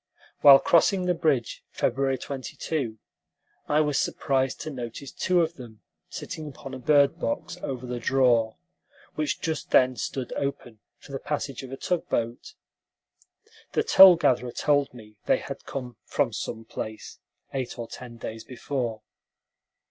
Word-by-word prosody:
While 140 -1 +10
crossing 180 +5 +3
the 180 - +2
bridge, 150 -8 0
February 135 +1 0
22, 130 -2 -4 0.7
I 150 +1 +3
was 150 -2 +1
surprised 135 -1 0
to 155 - -5
notice 125 +1 -7
two 180 -1 +2
of 165 +1 -4
them 115 -4 -12 0.3
sitting 155 -1 -6
upon 135 -1 -9
a 130 - -6
bird 145 +4 +3
box 285 -9 -3
over 130 -2 -4
the 125 -1 -4
draw, 120 -3 +2 0.6
which 155 -1 -2
just 160 -2 -3
then 130 0 +4
stood 125 +3 -4
open 125 -5 -4 0.2
for - - -15
the 135 - -4
passage 145 -3 -3
of 130 -1 -9
a 135 - -5
tug 175 +4 -2
boat. 120 - -3 1.2
The 450 - +2
toll 190 - +9
gatherer 125 -6 +1
told 145 +2 +1
me 110 -4 -14
they - - +4
had - - -8
come 125 -4 -6
"from 135 -6 0
some 115 +1 -5
place" 110 0 -7 0.3
eight 130 -2 -3
or 120 -1 -5
ten 120 -1 -10
days 110 -1 -7
before. 120 -2 -4
135 Hz, 150 wpm, -26 LUFS, 120-150 Hz, 1.2 s, While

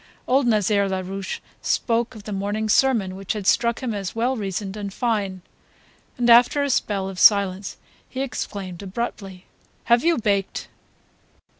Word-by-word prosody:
Old 260 0 +3
Nazaire 205 -2 +2
Larouche 190 0 -4 0.2
spoke 230 -1 0
of 215 - -11
the 210 - -7
morning's 205 +2 -1
sermon 225 -9 +2
which 195 0 -3
had 210 -3 -5
struck 235 +5 +2
him 240 -3 -2
as 195 -2 -4
well 245 +3 0
reasoned 200 -2 -4
and 205 -2 -5
fine; 200 -5 -2 0.7
then 245 -1 +1
after 245 +4 +6
a 280 - 0
spell 200 -5 0
of 190 -1 -7
silence 200 -2 +4 0.3
he 260 - -4
exclaimed 200 -8 -5
abruptly 195 -2 -5 0.4
"Have 235 +1 +3
you 335 0 +3
baked?" 200 -4 -1
205 Hz, 150 wpm, -23 LUFS, 195-235 Hz, 0.7 s, after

